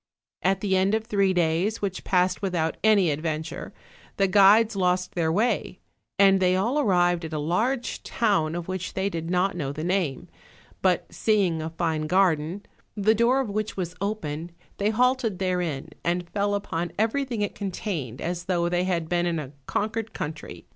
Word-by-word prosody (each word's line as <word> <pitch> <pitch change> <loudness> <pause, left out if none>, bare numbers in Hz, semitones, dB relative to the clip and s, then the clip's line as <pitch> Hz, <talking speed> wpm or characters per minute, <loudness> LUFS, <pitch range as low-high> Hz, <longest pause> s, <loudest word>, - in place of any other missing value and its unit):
At 190 0 +1
the 195 -2 +1
end 190 +3 +3
of 220 - -1
three 200 -4 +2
days, 175 +5 +1
which 195 -2 -3
passed 180 0 +1
without 175 -5 -1
any 205 -6 +4
ad 145 +1 -3
venture, 160 -1 -4 0.5
the 195 - +3
guides 210 +3 +5
lost 180 -1 0
their 165 -4 0
way, 210 0 0 0.4
and 195 -1 +6
they 185 -1 +3
all 235 +10 +1
arrived 175 - +2
at 160 0 -6
a - - -1
large 220 - -1
town 195 -8 0
of 175 -1 -5
which 185 -1 -4
they 195 +1 0
did 165 -1 -4
not 180 +2 +1
know 140 -6 -3
the 155 +2 -5
name; 175 -6 -1 0.5
but 185 -2 +2
seeing 195 -7 +1
a 160 - -3
fine 160 -2 -2
garden, 180 +1 +1 0.3
the 210 +2 +4
door 235 +4 +3
of 235 -6 -4
which 215 +1 -3
was 180 -2 -3
open, 170 -6 -3 0.3
they 205 +1 +1
halted 245 -2 +1
therein 180 -7 -2
and 175 +1 -1
fell 205 +1 0
upon 175 -4 -3
everything 230 +1 0
it 205 - -2
contained 175 - -4
as 175 0 -3
though 175 -2 +1
they 175 +1 0
had 170 -3 -1
been 175 +1 +1
in 170 -1 0
a 145 -4 -5 0.2
conquered 225 +1 -2
country. 155 +1 -6
185 Hz, 180 wpm, -25 LUFS, 170-205 Hz, 0.5 s, and